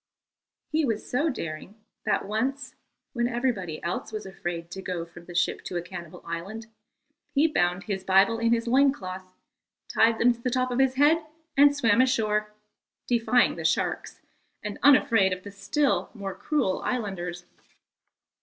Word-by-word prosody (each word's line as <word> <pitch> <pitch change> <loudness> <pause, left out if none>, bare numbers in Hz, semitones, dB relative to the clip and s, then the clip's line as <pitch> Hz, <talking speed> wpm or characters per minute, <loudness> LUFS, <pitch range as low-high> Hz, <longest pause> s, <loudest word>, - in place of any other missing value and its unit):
He 310 +1 +2
was 225 -6 -1
so 290 +6 +1
daring 165 - -6 0.3
that - - +1
once, 260 +5 -2 0.4
when 240 -2 +1
everybody 235 -10 -2
else 170 - -3
was 215 -2 -5
afraid 175 -3 -5
to 190 - -6
go 180 -3 -4
from 170 0 -14
the 175 - -10
ship 180 +1 0
to 180 - -3
a - - -1
cannibal 175 -2 -9
island, 190 +7 -5 0.7
he 285 +3 +5
bound 180 - +1
his 195 -3 -3
Bible 195 +4 +4
in 230 0 +2
his 230 0 +2
loin 270 +3 +4
cloth, 185 -6 -8 0.5
tied 225 0 +3
them 245 +1 +4
to 235 - -17
the 250 - 0
top 255 0 0
of 245 - -1
his 265 -1 +3
head, 305 +4 +4 0.3
and 285 +1 +6
swam 230 -3 +4
ashore, 215 -5 +1 0.5
defying 245 +1 +2
the - - -5
sharks, - - -1 0.4
and 210 -1 -5
unafraid 225 -8 +5
of 185 0 -7
the 205 - -8
still 200 +9 0
more 195 -3 -5
cruel 275 -9 -1
islanders. 180 -7 -3
215 Hz, 165 wpm, -26 LUFS, 185-255 Hz, 0.7 s, and